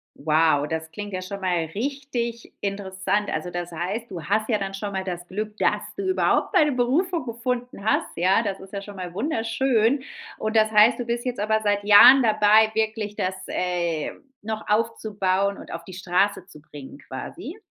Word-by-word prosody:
Wow, 155 -1 +2
das 160 +1 -4
klingt 205 +4 -7
ja 185 - -3
schon 195 +2 -7
mal 175 -3 0
richtig 240 -2 -3
interessant. 200 0 -2
Also, 180 - -3
das 175 0 -5
heißt, 195 +8 -4
du 170 -4 -7
hast 215 +5 0
ja 220 - +3
dann 195 -1 -4
schon 200 +1 -4
mal 190 -1 -3
das 175 -1 -6
Glück, 210 +3 -5
dass - - +1
du 395 -1 -3
überhaupt 375 - +1
deine 300 -1 +5
Berufung 280 +6 0
gefunden 240 -2 -4
hast, 220 - +2
ja, 185 +5 +3
das 200 -4 -3
ist 190 +1 -13
ja 200 - -4
schon 205 0 -10
mal 180 -2 -6
wunderschön. 230 - +1 0.4
Und 215 +1 -2
das 220 0 +4
heißt, 215 +4 +6
du 245 - -3
bist 235 0 -2
jetzt 250 -3 -3
aber 220 +1 +1
seit 205 -1 0
Jahren 245 +6 +9
dabei, 215 0 +5
wirklich 220 -1 -1
das, 185 -1 -2
äh, 170 -3 -1 0.3
noch 220 +1 -5
aufzubauen 200 -3 0
und - - -11
auf 170 - -6
die 185 - -11
Straße 185 +1 0
zu 150 -6 -15
bringen, 145 -2 -11
quasi? - - -8
205 Hz, 185 wpm, -24 LUFS, 185-230 Hz, 0.4 s, Jahren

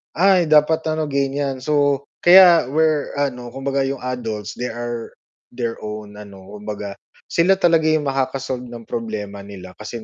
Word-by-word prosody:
"Ay 185 0 +4
dapat 155 +1 +3
ano, 155 0 0
ganyan." 140 -1 -1
So, 145 0 +1 0.2
kaya 175 -6 +7
we're 155 -1 +1
ano, 125 -4 -2
kumbaga, 135 +1 -1
yung 135 0 -3
adults, 115 -5 -5
they 125 - -4
are 120 0 -5 0.4
their 120 -2 -3
own 105 -1 -7
ano, 100 -2 -12
kumbaga 105 -1 -6 0.4
sila 180 +3 +4
talaga 165 -4 +3
yung 155 -1 +2
makaka-solve 135 -2 -2
ng 120 -1 -9
problema 110 -3 -5
nila 100 -2 -10
kasi 110 +1 -7
130 Hz, 150 wpm, -20 LUFS, 110-150 Hz, 0.4 s, kaya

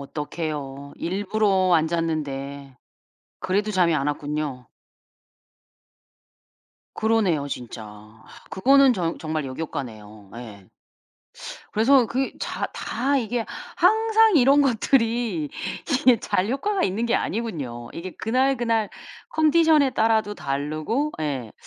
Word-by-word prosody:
어떡해요. 145 -1 -5
일부러 195 0 +1
안 160 -1 +3
잤는데 140 -5 -3 0.6
그래도 205 +3 0
잠이 180 -4 +3
안 140 -1 -1
왔군요. 145 -3 -3 2.3
그러네요 210 -10 +1
진짜. 110 -3 -9 0.3
그거는 270 +6 +5
정 175 -6 -2
정말 155 -2 -3
역효과네요. 115 -8 -7
예. 105 -5 -10 1.1
그래서 250 +3 +4
그 260 +4 -1
자 - - -3
다 270 +5 -1
이게 235 -1 -2 0.3
항상 440 +2 +4
이런 280 +2 +5
것들이 245 +2 +1 0.5
이게 250 -5 +5
잘 185 +3 0
효과가 390 +10 -1
있는 200 +5 -1
게 235 - +1
아니군요. 140 - -3
이게 185 +3 -6
그날, 260 +4 +1
그날 230 -3 0 0.4
컨디션에 315 - +4
따라도 220 -3 +1
다르고 155 - -2
예 135 -7 -3
185 Hz, 230 characters per minute, -24 LUFS, -, 2.3 s, 그거는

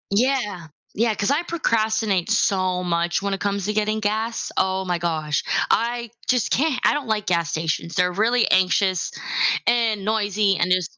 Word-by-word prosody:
Yeah. 225 -6 0 0.3
Yeah, 225 0 +1
cause 205 +5 0
I 290 +3 +2
procrastinate 220 - 0
so 185 -3 +1
much 170 +1 0
when 200 0 -1
it 195 - -3
comes 200 -1 -2
to 210 - -1
getting 215 +1 0
gas. 220 +2 -2
Oh 190 0 0
my 175 -1 -1
gosh, 155 -3 -1 0.3
I 235 0 0 0.2
just 250 -3 +1
can't. 285 -2 +1
I - - +4
don't 295 -3 -3
like 215 -2 -1
gas 170 -3 0
stations, 160 +2 -2
they're 180 0 +2
really 225 +6 +2
anxious 185 0 +2 0.6
and 230 -4 +2
noisy, 205 -2 +1
and 180 - 0
there's 180 -2 0
205 Hz, 170 wpm, -22 LUFS, 180-225 Hz, 0.6 s, I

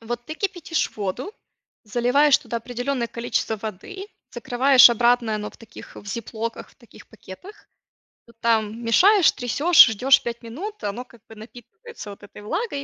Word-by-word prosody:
Вот 240 +1 -6
ты 310 - -6
кипятишь 350 -3 -3
воду, 210 - -5 0.5
заливаешь 250 +6 +2
туда 235 - -5
определенное 245 +1 -4
количество 230 -1 -3
воды, 220 - -8 0.3
закрываешь 255 +2 +5
обратно, 235 0 +1
и - - 0
оно 210 0 -5
в - - -20
таких 225 -1 -14
в 205 - -12
зиплоках, 230 +2 -6
в - - -26
таких 235 - -18
пакетах. 225 - -14 0.6
Ну 235 - -19
там 225 0 0
мешаешь, 365 - +4
трясёшь, 295 +8 +5
ждёшь 255 +5 +3
пять 235 0 -6
минут, 365 - -8
оно 210 +5 -5
как 235 -3 -21
бы 225 - -13
напитывается 240 - -13
вот 200 0 -12
этой 205 - -13
влагой. 320 - -4
240 Hz, 160 wpm, -22 LUFS, 220-280 Hz, 0.6 s, закрываешь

